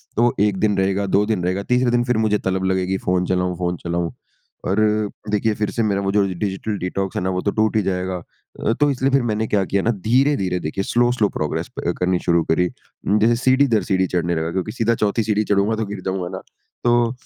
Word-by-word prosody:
तो 120 - +3
वो 120 - +3
1 100 -1 +2
दिन 105 -1 +2
रहेगा 95 +1 +1
2 100 +2 +2
दिन 105 -5 -1
रहेगा 95 +3 -1
3 125 +2 +2
दिन 120 0 +2
फिर 125 -2 0
मुझे 110 -1 +2
तलब 95 -1 -2
लगेगी 95 0 0
फ़ोन 90 0 0
चलाऊँ, 90 -1 0
फ़ोन 90 -1 -2
चलाऊँ। 85 0 -1 0.5
और 95 +3 +1 0.5
देखिए 105 +1 +1
फिर 105 -1 -1
से 115 - 0
मेरा 100 -2 0
वो 95 0 0
जो 105 -1 +3 0.2
डिजिटल 105 +1 -2
डिटॉक्स 95 +1 -3
है - - 0
ना 95 - 0
वो 90 0 -1
तो 100 - 0
टूट 110 +1 +1
ही 110 - +4
जाएगा। 95 0 -2 0.4
अ, 115 - +1
तो 145 +4 +2
इसलिए 135 +1 0
फिर 135 -1 +4
मैंने 110 -1 -1
क्या 100 -2 +1
किया 100 +1 0
ना 115 - +2 0.4
धीरे-धीरे 90 -9 -1
देखिए 85 +5 -3
स्लो-स्लो 120 -2 +2
प्रोग्रेस 75 -1 -3
प - - -1
करनी 90 0 +1
शुरू 85 -2 +3
करी। 90 +2 +2 0.5
जैसे 115 +2 +4
सीढ़ी 130 +2 +4
दर 110 -3 +2
सीढ़ी 95 -1 +1
चढ़ने 85 -1 -1
लगा 80 +1 -2
क्योंकि 95 +4 -2
सीधा 115 0 +1
चौथी 105 +2 0
सीढ़ी 105 0 +1
चढ़ूँगा 100 +2 +1
तो 110 0 -2
गिर 100 -1 -6
जाऊँगा 95 -2 -2
ना? - - -8 0.4
तो 120 -1 +3
100 Hz, 230 wpm, -21 LUFS, 90-110 Hz, 0.5 s, ही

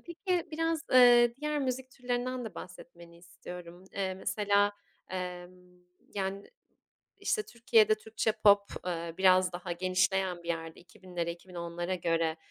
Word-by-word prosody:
peki 350 0 -2
biraz, 325 0 0
ııı, 240 -1 +7
diğer 300 0 -1
müzik 260 -1 -2
türlerinden 250 0 -3
de 210 -6 -7
bahsetmeni 170 -1 -11
istiyorum. 175 0 -11
Eee, 190 -1 -2
mesela, 205 +1 +1 0.4
emm, 180 -1 -5 0.6
yani, 195 0 -3 0.7
işte, 430 - 0
Türkiye'de 225 - +3
Türkçe 220 0 -2
pop, 200 -1 +5 0.2
ııı, 170 -2 -3
biraz 185 -1 +5
daha 175 0 -5
genişleyen 185 0 0
bir 170 - -10
yerde 165 -1 -4
2000'lere, 175 -1 -6
2010'lara 175 0 -5
göre, 165 -2 0
190 Hz, 125 wpm, -30 LUFS, 175-240 Hz, 0.7 s, ııı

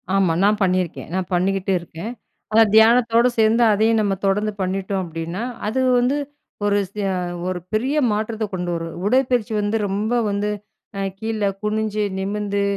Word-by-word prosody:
ஆமா. 190 -4 +3
நான் 210 +1 +3
பண்ணிருக்கேன். 185 -4 -1
நான் 185 -1 -2
பண்ணிக்கிட்டு 190 +2 +1
இருக்கேன். 170 +5 -7 0.4
அந்த 225 +1 +7
தியானத்தோட 230 +1 +5
சேர்ந்து, 220 +2 +4
அதையும் 220 +2 +3
நம்ம 200 -2 +1
தொடர்ந்து 210 +2 +1
பண்ணிட்டோம், 190 +1 -2
அப்படின்னா, 165 +5 -5 0.2
அது 230 +5 -1 0.2
வந்து 250 +3 +1 0.5
ஒரு 205 0 +2
விசய 195 0 -3 0.4
ஒரு 185 -1 -3
பெரிய 260 +7 0
மாற்றத்த 220 +1 -2
கொண்டு 180 -1 -3
வரும். 165 -1 -5
உடற்பயிற்சி 245 -1 +1
வந்து 205 +2 0
ரொம்ப 205 +4 -1 0.2
வந்து 200 +1 -1 0.5
அ - - -1 0.2
கீழ 220 -2 -1 0.2
குனிஞ்சு, 215 0 -1
நிமிர்ந்து, 200 +1 -1
205 Hz, 145 wpm, -21 LUFS, 190-220 Hz, 0.5 s, அந்த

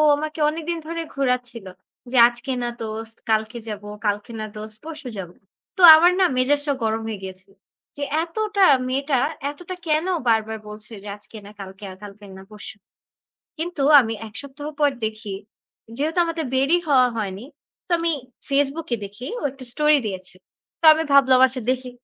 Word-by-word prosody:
আমাকে 310 +2 -5
অনেকদিন 330 +2 -3
ধরে 335 0 -3
ঘোরাচ্ছিল। 250 -5 -1 0.5
যে, 260 - 0
"আজকে 240 +3 -4
না 240 - -1
দোস্ত, 225 +1 -6 0.2
কালকে 220 +2 0
যাবো, 205 0 -7 0.2
কালকে 205 +3 -2
না 215 - -4
দোস্ত, 215 0 -8
পরশু 305 -5 -7
যাব।" 180 -3 -6 0.5
তো - - -2
আমার 345 +3 +5
না - - +6
মেজাজটা 290 +2 +1
গরম 220 0 0
হয়ে 210 -3 -5
গিয়েছিল। 190 +1 -10 0.5
যে 285 - -3 0.2
এতটা 405 +2 +1 0.2
মেয়েটা 275 0 0 0.3
এতটা 355 +4 -8
কেন 310 +3 +1 0.2
বারবার 220 0 +1
বলছে 215 +1 -10
যে, - - -9
"আজকে 215 +1 -13
না 205 - -11
কালকে, 195 +1 -10
আর 185 - -12
কালকে 205 0 -11
না - - -12
পরশু।" 210 +1 -10 0.8
কিন্তু 330 -4 -2 0.2
আমি 225 -1 -3
1 210 - -16
সপ্তাহ 285 +1 -9
পর 290 -1 +4
দেখি, 215 -2 -5 0.6
যেহেতু 310 +4 -1
আমাদের 330 -2 -3
বেরই 280 +7 +3
হওয়া 255 -3 +5
হয়নি, 205 +1 -4 0.4
তো - - -10
আমি 335 0 +1 0.4
Facebook 285 +3 0
এ - - -8
দেখি 210 +7 -9
ও - - -7
একটা 270 -1 -12
স্টোরি 300 0 +4
দিয়েছে। 185 -2 -6 0.5
তো - - 0
আমি 320 - -1
ভাবলাম, 260 -2 +6
"আচ্ছা, 255 -1 -6
দেখি 255 -1 -3
255 Hz, 170 wpm, -22 LUFS, 215-300 Hz, 0.8 s, না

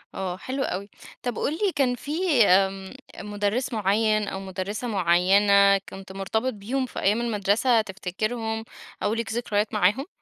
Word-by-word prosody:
آه، 185 -1 -3
حلو 265 +6 -3
أوي. 200 -1 -4 0.3
طب، 245 -2 -3
قل 290 - 0
لى 390 +4 0
كان 255 -3 +2
في 295 - +1
آمم، 190 +1 +2 0.3
مُدرس 210 +5 -2
معين 215 0 +1
أو 190 - -4
مُدرسة 195 +5 -5
معينة 200 +1 +4
كنت 190 0 -10
مرتبط 220 +6 -2
بيهم 240 +6 -2
في - - -7
أيام 210 +4 +2
المدرسة، 225 +1 +2
تفتكرهم 220 +3 -3 0.4
أو 210 - +1
ليك 225 -1 -3
ذكريات 220 -3 -1
معاهم؟ 210 - +2
210 Hz, 145 wpm, -25 LUFS, 195-240 Hz, 0.4 s, معينة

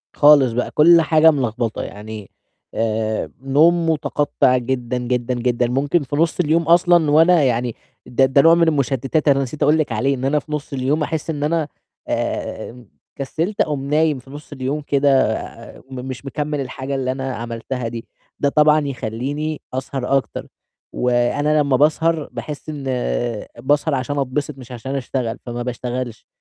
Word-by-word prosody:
خالص 145 -4 +6
بقى، 125 - -2
كُلّ 170 +2 +6
حاجة 160 0 +5
ملخبطة، 120 -5 -2
يعني 105 -1 -8 0.4
آآ، 110 -1 -1
نوم 165 +5 +3
متقطّع 145 -4 +1
جدًا، 125 0 -2
جدًا، 125 0 -1
جدًا، 120 0 0
ممكن 140 +5 +1
في 140 +2 -4
نُص 165 +3 +1
اليوم 165 0 +2
أصلًا 170 -2 +4
وأنا 165 +1 +5
يعني 120 -2 0 0.3
ده 135 +2 +2
ده 130 +1 +4
نوع 165 +3 +6
من 170 -1 +3
المشتتات 140 +1 0
أنا 140 -1 +4
نسيت 140 +4 -4
أقول 150 +2 +4
لِك 155 -5 -1
عليه، 135 +5 +1
إن 130 - -4
أنا 150 +2 +2
في 150 - -14
نُص 150 -1 -4
اليوم 140 +4 0
أحس 160 +1 -3
إن 145 -2 -2
أنا 155 -1 0 0.4
آمم، 120 -2 -4 0.3
كسّلت، 165 +8 -2
أقوم 145 -3 -1
نايم 155 -2 +2
في 130 +2 -17
نُص 145 +1 -11
اليوم 140 +2 -3
كده، 140 -2 +2 0.5
مش 130 +1 -7
مكمِّل 150 +1 -3
الحاجة 135 +1 -5
اللي 130 -1 -1
أنا 130 -1 -4
عملتها 115 +1 -5
دي. 115 0 -7 0.3
ده 140 - +2
طبعًا 150 +1 +4
يخلّيني 140 +5 -4
أسهر 135 0 -1
أكتر، 135 - -5 0.5
وأنا 125 +5 +1
لمّا 140 -2 +2
باسهر، 155 +1 +2
باحس 150 +1 -7
إن 145 -3 -6 0.8
باسهر 145 +3 +1
عشان 140 +3 -2
أتبسط، 140 +1 -2
مش 130 -1 -12
عشان 130 +3 -5
أشتغل، 125 -3 -3
فما 120 0 -4
باشتغلش، 125 -1 -5
135 Hz, 160 wpm, -20 LUFS, 125-150 Hz, 0.8 s, خالص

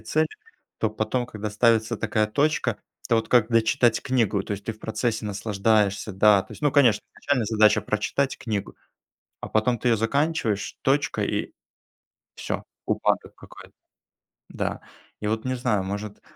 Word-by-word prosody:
цели, 155 +9 0 0.5
то 110 - +1
потом 110 +3 -2
когда 105 -2 -5
ставится 110 +1 +2
такая 110 -1 +1
точка, 130 -1 0 0.3
это 115 - +2
вот 110 - -1
как 120 -2 +4
дочитать 115 0 +3
книгу, 115 -7 +1
то 105 - -5
есть 100 0 -6
ты 115 - -3
в 110 - -18
процессе 110 0 -2
наслаждаешься, 105 0 0
да, 100 +1 +5
то - - -14
есть - - -12
ну 145 -2 +2
конечно 120 -8 +4
начальная 135 -6 0
задача 110 -2 +4
прочитать 130 +6 -1
книгу, 105 -4 -4 0.7
а - - -6
потом 115 +3 +1
ты 125 - 0
её 115 - +4
заканчиваешь, 115 -3 0
точка- 140 +2 +1
и - - -2 0.8
всё, - - -4 0.2
упадок - - 0
какой-то. - - -14 0.8
Да. - - -3 0.4
И - - -2
вот 110 +2 -1
не 130 - 0
знаю, 110 -6 0
может 100 +1 -5
110 Hz, 160 wpm, -25 LUFS, 105-125 Hz, 0.8 s, да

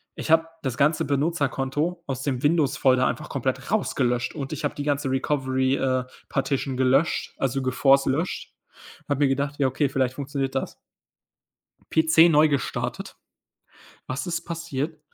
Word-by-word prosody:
Ich 160 - -4
habe 165 0 +5 0.2
das 130 -4 -2
ganze 150 +3 +2
Benutzerkonto 145 +2 -1
aus 135 -1 -3
dem 130 -4 -2
Windows 150 -2 +2
Folder 130 -1 +3
einfach - - -4
komplett - - -2
rausgelöscht 120 -2 0
und 135 -3 -5
ich 155 - -6
habe 145 - -1
die 145 - -4
ganze 145 -1 0
Recovery, 130 -1 0
äh, 130 -2 0 0.3
Partition 135 0 -1
gelöscht, 135 +5 +2
also 135 0 -1
geforced 135 +1 +3
löscht. 160 +7 -2 0.5
Habe 145 -1 -1
mir - - +3
gedacht: 140 +2 -1
„Ja 135 - +3
okay, 135 +2 0
vielleicht 130 -1 -1
funktioniert 140 -1 -3
das.“ 135 - -2 1.2
PC 160 +1 +5
neu 155 -1 +5
gestartet. 140 -3 -3 0.9
Was 130 +8 -4
ist 165 -1 -2
passiert? 160 -2 -4
140 Hz, 150 wpm, -25 LUFS, 130-155 Hz, 1.2 s, habe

